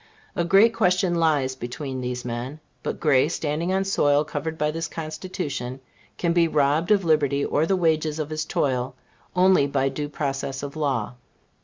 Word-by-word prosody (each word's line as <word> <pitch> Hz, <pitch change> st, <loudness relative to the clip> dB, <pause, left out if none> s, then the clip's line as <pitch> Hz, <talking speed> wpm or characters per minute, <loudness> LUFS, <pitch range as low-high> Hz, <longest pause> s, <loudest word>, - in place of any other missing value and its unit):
A 175 Hz, -, +1 dB
great 195 Hz, +6 st, +5 dB
question 180 Hz, -4 st, +2 dB
lies 150 Hz, -6 st, +1 dB
between 130 Hz, +1 st, -5 dB
these 125 Hz, 0 st, -4 dB
men. 125 Hz, +5 st, -5 dB, 0.2 s
But -, -, -4 dB
Gray, 145 Hz, -2 st, +3 dB
standing 160 Hz, +1 st, -2 dB
on 190 Hz, 0 st, +1 dB
soil 145 Hz, -6 st, +2 dB
covered 160 Hz, +2 st, -4 dB
by 150 Hz, 0 st, +1 dB
this 165 Hz, +1 st, -3 dB
Constitution, 155 Hz, -6 st, -5 dB, 0.4 s
can 170 Hz, -1 st, +1 dB
be 170 Hz, -1 st, +4 dB
robbed 150 Hz, +1 st, +2 dB
of 200 Hz, -3 st, +3 dB
liberty, 145 Hz, -3 st, +2 dB
or 155 Hz, +2 st, +1 dB
the 195 Hz, -, +2 dB
wages 160 Hz, -3 st, +1 dB
of 155 Hz, -1 st, -4 dB
his 155 Hz, 0 st, -1 dB
toil, 130 Hz, -3 st, -1 dB, 0.4 s
only 180 Hz, -5 st, +5 dB
by 135 Hz, -1 st, +1 dB
due 145 Hz, +1 st, -4 dB
process 135 Hz, -2 st, -3 dB
of 140 Hz, +1 st, -6 dB
law. 135 Hz, -8 st, -1 dB
150 Hz, 170 wpm, -24 LUFS, 135-170 Hz, 0.4 s, great